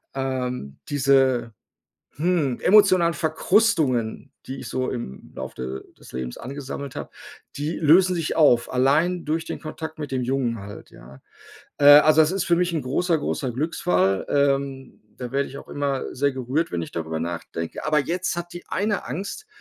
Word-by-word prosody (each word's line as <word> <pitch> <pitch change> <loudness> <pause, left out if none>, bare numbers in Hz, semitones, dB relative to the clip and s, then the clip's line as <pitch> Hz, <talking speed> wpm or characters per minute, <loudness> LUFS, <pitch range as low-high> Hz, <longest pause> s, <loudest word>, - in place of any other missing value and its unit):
ähm, 125 - -3
diese, 135 -4 +2 0.6
hm, 150 -5 0
emotionalen 185 -4 +5
Verkrustungen, 155 - +1
die 135 +1 -6
ich - - -7
so 130 0 -1
im 120 - -7
Lauf - - -6
de 65 +1 -5 0.2
des - - -15
Lebens 65 -1 -5
angesammelt 140 +1 -7
habe, - - -6 0.5
die 150 +4 -3
lösen 180 +4 +5
sich 165 -2 -2
auf, 135 -7 +4
allein 155 +8 +2
durch 160 +2 -1
den - - -5
Kontakt 160 0 -7
mit 145 -3 -5
dem 130 -1 -1
Jungen 120 -3 -1
halt, 100 +1 -10
ja? 65 +3 -15 0.6
Äh, 145 - +2
also, 150 +2 +8
das 155 +1 +2
ist 195 -1 -1
für 170 - +3
mich 180 +1 +1
'n 155 -4 -1
großer, 165 +6 +1
großer 140 -3 -2
Glücksfall. 95 - 0
Ähm, 140 -2 0 0.2
da 125 -2 -6
werde 140 0 0
ich 135 - -9
auch - - -11
immer 140 -2 -3
sehr 140 +2 +1
gerührt, 130 +5 -2
wenn 85 - -2
ich 80 - -7
darüber 80 -1 -4
nachdenke. 85 0 -5
Aber 155 0 +3
jetzt 175 +5 -2
hat 175 0 -5
die 175 - -8
eine 205 0 -1
Angst, 200 - -6
140 Hz, 170 wpm, -23 LUFS, 125-165 Hz, 0.6 s, also